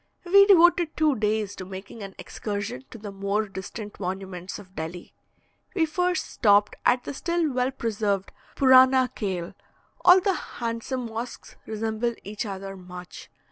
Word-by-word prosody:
We 395 +3 +7
devoted 345 -3 +5
two 305 -3 +3
days 215 -2 -1
to - - -6
making 190 +4 -9
an 195 -1 -8
excursion 200 - -5
to - - -10
the 205 -2 -7
more 200 +2 -1
distant 200 +2 -8
monuments 190 -1 -5
of 190 -2 -14
Delhi. 165 +2 -6 0.6
We 335 -4 +3
first 360 +3 0
stopped 205 -2 +3
at 245 0 +3
the - - -5
still 335 +1 0
well 250 0 +1
preserved 210 -6 -2 0.2
"Purana 260 -1 +6
Kale." 185 -5 -3 0.5
All 365 +1 +8
the 385 +1 +1
handsome 240 -3 -4
mosques 230 +2 -7
resemble 220 +2 -2
each 210 +2 -5
other 195 0 -6
much. 180 -1 -10
220 Hz, 145 wpm, -26 LUFS, 195-260 Hz, 0.6 s, All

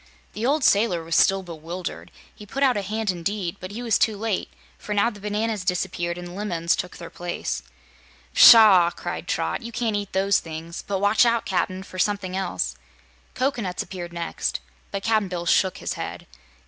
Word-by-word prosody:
The 225 +3 -2
old 295 +1 +2
sailor 200 -6 +3
was 165 0 -2
still 195 0 +4
bewildered. 170 +1 -7 0.2
He 210 - -13
put 275 +7 -2
out 260 -2 +4
a 205 - 0
hand 215 +1 -1
indeed, 180 +1 -3
but 185 - -7
he 225 +5 -6
was 230 -4 +2
too 220 -1 +2
late, 215 -2 -2 0.3
for 210 - -4
now 220 +4 +3
the 210 - -12
bananas 210 0 -2
disappeared 175 -1 -1
and 175 0 -8
lemons 175 -5 0
took 180 - -5
their 170 - -9
place. 175 0 -4 0.7
"Pshaw!" 210 -7 +9
cried - - -6
Trot. - - -1
"You 235 0 -7
can't 225 -2 -1
eat 205 -1 -4
those 195 +1 +3
things; 165 +1 -7
but 200 - 0
watch 205 +4 +4
out, 235 -1 +2
Cap'n, 185 0 -1
for 185 0 -9
something 195 -1 0
else." 175 - -2 0.6
Cocoanuts 240 -9 -1
next 170 -2 -4
appeared, - - -3 0.3
but 200 -1 -4
Cap'n 220 -3 +2
Bill 175 -2 -4
shook 185 +2 +2
his - - -3
head. - - -6
195 Hz, 185 wpm, -24 LUFS, 175-215 Hz, 0.7 s, Pshaw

